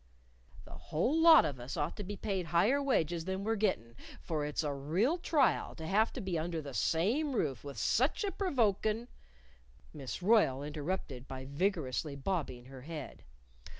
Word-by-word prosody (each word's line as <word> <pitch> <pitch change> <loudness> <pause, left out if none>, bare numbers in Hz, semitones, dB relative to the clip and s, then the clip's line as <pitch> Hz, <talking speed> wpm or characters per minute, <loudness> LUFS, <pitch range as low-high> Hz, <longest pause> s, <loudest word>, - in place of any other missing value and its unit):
" - - -21
'The - - -14
whole 255 - 0
lot 325 -1 +8
of 135 -4 -3
us 125 +2 -6
ought 150 +2 -1
to 205 - -5
be 205 +2 -5
paid 190 -5 -2
higher 200 - +3
wages 170 - 0
than 190 +1 -3
we're 225 +2 0
gettin' 185 - -1 0.2
for 155 -3 -3
it's 150 +2 -2
a 145 -1 -1
real 180 - 0
trial 300 -5 +1
to 160 - -7
have 210 +7 +2
to - - -6
be 185 -6 -2
under 165 +1 -3
the 140 -3 -7
same 230 - +1
roof 135 - -1
with 140 -3 -8
such 255 - +1
a 400 - -1
provokin' 230 - 0 0.5
'" - - -28
Miss 145 +4 -6
Royle 180 - +4
interrupted 150 -3 -4
by 130 0 -7
vigorously 145 - -1
bobbing 140 -5 -3
her 130 0 -11
head. 150 0 -8
165 Hz, 180 wpm, -33 LUFS, 140-215 Hz, 0.5 s, lot